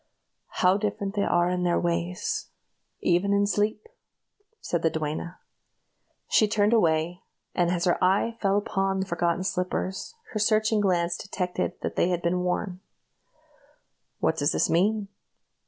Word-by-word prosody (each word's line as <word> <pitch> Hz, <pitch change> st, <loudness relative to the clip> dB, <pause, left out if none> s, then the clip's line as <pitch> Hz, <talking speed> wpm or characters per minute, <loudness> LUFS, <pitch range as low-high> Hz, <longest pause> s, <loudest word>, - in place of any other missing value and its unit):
"How 185 Hz, +2 st, +5 dB
different 200 Hz, -1 st, -2 dB
they 205 Hz, -, 0 dB
are 175 Hz, 0 st, +2 dB
in 180 Hz, 0 st, -1 dB
their 175 Hz, -1 st, +2 dB
ways, 170 Hz, +1 st, -2 dB, 0.5 s
even 185 Hz, +3 st, +2 dB
in 200 Hz, 0 st, +3 dB
sleep!" 210 Hz, -, 0 dB, 0.7 s
said 170 Hz, -, -2 dB
the 165 Hz, -, +3 dB
duenna. 160 Hz, +3 st, -4 dB, 0.9 s
She 215 Hz, -, +4 dB
turned 210 Hz, +1 st, +2 dB
away, 170 Hz, -4 st, +2 dB, 0.3 s
and 175 Hz, -1 st, +2 dB
as 175 Hz, 0 st, 0 dB
her 175 Hz, -, +1 dB
eye 195 Hz, +5 st, +2 dB
fell 195 Hz, -1 st, +2 dB
upon 195 Hz, -2 st, 0 dB
the -, -, -1 dB
forgotten 170 Hz, 0 st, 0 dB
slippers, 185 Hz, -, -3 dB, 0.2 s
her 215 Hz, -, -2 dB
searching 215 Hz, 0 st, +2 dB
glance 175 Hz, -3 st, +1 dB
detected 180 Hz, -2 st, -3 dB
that -, -, -4 dB
they 175 Hz, -, +3 dB
had 175 Hz, -1 st, -1 dB
been 175 Hz, +1 st, +1 dB
worn. 180 Hz, +1 st, -2 dB, 1.4 s
"What 160 Hz, -, 0 dB
does 145 Hz, -1 st, +1 dB
this -, -, +1 dB
mean? 205 Hz, +4 st, +2 dB
185 Hz, 145 wpm, -26 LUFS, 175-205 Hz, 1.4 s, How